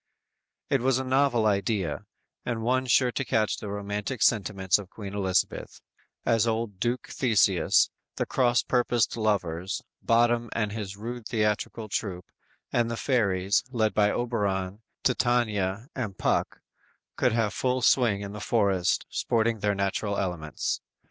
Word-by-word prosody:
It 135 -3 +3
was 130 0 +2
a 130 - -2
novel 130 -3 +2
idea, 100 -5 0 0.4
and 115 -2 -3
one 130 +2 +1
sure 125 +1 +4
to 135 - -2
catch 110 -3 +1
the 105 - -6
romantic 105 +3 -3
sentiments 100 -4 +2
of 100 -3 -9
Queen 100 -2 -8
Elizabeth, 95 -2 -1 0.5
as 115 0 +3
old 110 -4 -2
Duke 120 +3 -1
Theseus, 105 -7 +3 0.2
the - - -1
cross 125 -2 +2
purposed 120 -3 +1
lovers, 95 -4 -1 0.2
Bottom 120 0 +2
and 105 -3 -1
his 100 -3 -5
rude 115 +1 -6
theatrical 110 0 -1
troop, 95 -4 -3 0.5
and 120 -1 +2
the 115 - -3
fairies, 100 -7 +1
led 110 -4 0
by 105 -1 +3
Oberon, 105 -4 -1 0.2
Titania 115 -4 +1
and 105 -7 -4
Puck - - 0 0.5
could - - +2
have 110 -2 +1
full 130 -1 0
swing 115 -6 +3
in 100 -1 -6
the 105 - -6
forest, 100 -7 +1
sporting 115 0 0
in - - -18
their 105 -1 +1
natural 100 +1 -1
elements. 85 -5 -2
110 Hz, 145 wpm, -27 LUFS, 100-120 Hz, 0.5 s, sure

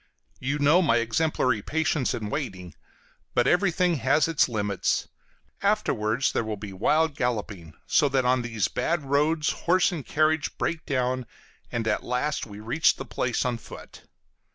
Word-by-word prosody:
You 140 +3 -1
know 150 +5 +4
my 120 -9 +3
exemplary 115 -1 +1
patience 160 0 0
in 105 -2 -5
waiting, 95 - -4 0.6
but 120 - +3
everything 180 -2 +2
has 140 +4 +2
its 165 -5 +2
limits; 105 -4 -1 0.5
afterwards 135 - +1
there - - 0
will 110 -1 -4
be 100 -1 -8
wild 155 +10 +1
galloping, 105 - -3
so 145 -3 +3
that 130 -1 +1
on 125 0 +3
these 115 -4 -1
bad 170 -2 -1
roads 150 +3 +1
horse 180 +2 +2
and 165 -6 -5
carriage 155 +1 0
break 165 -1 -2
down, 130 -2 -1 0.4
and 115 -1 -2
at 105 - +1
last 125 +4 -2
we 105 -1 -10
reach 120 +9 +2
the - - -7
place 125 0 -1
on 120 -2 -1
foot. - - -12
130 Hz, 155 wpm, -26 LUFS, 115-155 Hz, 0.6 s, know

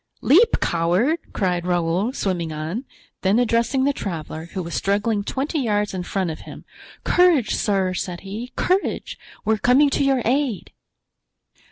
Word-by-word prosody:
"Leap, 410 - +5
coward!" 180 - +1
cried 180 -3 -1
Raoul, 175 +4 0
swimming 180 - -2
on; 160 - -4 0.4
then 195 +3 +2
addressing 240 +2 +2
the 285 +1 +2
traveler, 160 - -5
who 185 - -3
was 170 - -7
struggling 205 +1 0
twenty 275 +8 -2
yards 210 -5 0
in 185 - -3
front 180 -1 -2
of 155 - -7
him: - - -11 0.4
"Courage, 345 -11 +3
sir!" 195 -3 0
said 180 -1 -4
he, 215 +6 -7
"courage! 375 +2 -1 0.3
we 220 - +3
are - - 0
coming 275 +5 +4
to - - +1
your 270 -3 +2
aid." 255 -5 0
205 Hz, 155 wpm, -22 LUFS, 180-260 Hz, 0.4 s, Leap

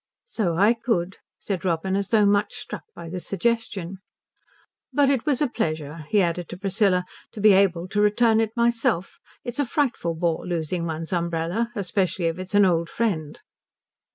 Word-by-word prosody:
"So 195 - -1
I 205 +5 +5
could," 190 -6 -1 0.2
said 190 -4 -4
Robin, 185 +1 0
as 200 0 -1
though 215 -2 +4
much 205 +3 +2
struck 245 -1 -6
by 170 - -8
the 180 +2 -5
suggestion. 195 -2 -2 0.9
"But 280 +1 +3
it 265 -1 -1
was 290 -1 +2
a - - +2
pleasure," 155 - -3
he 205 -2 +4
added 170 0 -2
to 175 - -7
Priscilla, 195 -1 +1 0.3
"to - - -8
be 210 0 +6
able 185 -3 +3
to 205 +1 +1
return 220 +2 +4
it 225 +1 -3
myself. 235 -6 0 0.2
It's 245 +2 -5
a - - +4
frightful 240 - -1
bore 165 -1 -1
losing 170 0 -2
one's 160 +2 -4
umbrella 170 +6 -1
especially 185 -2 0
if 165 +2 -1
it's 185 +2 -5
an 205 -1 +6
old 170 -2 +1
friend." 165 -10 -2
190 Hz, 175 wpm, -24 LUFS, 170-225 Hz, 0.9 s, be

